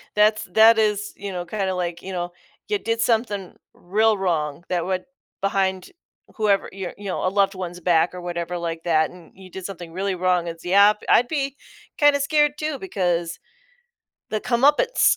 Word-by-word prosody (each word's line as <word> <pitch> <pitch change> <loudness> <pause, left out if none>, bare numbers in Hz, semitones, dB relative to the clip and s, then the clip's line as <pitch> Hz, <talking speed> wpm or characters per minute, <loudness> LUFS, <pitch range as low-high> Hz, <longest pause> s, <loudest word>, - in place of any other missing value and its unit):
that's 215 +1 +4
that's 180 - -23
that 225 +1 +7
is, 210 -1 0
you 200 -1 -6
know, 175 -1 -4
kinda 190 0 -2
like, 175 -1 -3
you 190 - -7
know, 175 -1 -3 0.4
you 420 - +1
did 230 -4 -1
something 220 -5 0 0.2
real 215 +4 +1
wrong 160 -5 -1
that 175 -2 0
would 185 0 -2 0.4
behind 190 -1 0 0.5
whoever, 210 -4 +1
your 190 -2 -6
you 205 - -11
know, 185 - -2
a 185 - +3
loved 195 0 +1
one's 180 -1 -6
back 170 0 +2
or 180 - -7
whatever 175 0 -4
like 165 -1 -4
that, 160 -2 +2
and 180 -2 -15
you 190 -1 -13
did 185 0 -8
something 175 -4 -7
really 190 +1 -2
wrong, 180 -1 +1
it's, 165 0 -7
yeah, 200 +3 +6 0.2
I'd 240 - +5
be 275 -2 -2 0.4
kind 290 -1 +6
of 285 - 0
scared 295 0 +3
too 305 -2 -2
because 175 - -1 0.9
the 215 - 0
comeuppance, 290 - +3
190 Hz, 185 wpm, -23 LUFS, 175-220 Hz, 0.9 s, that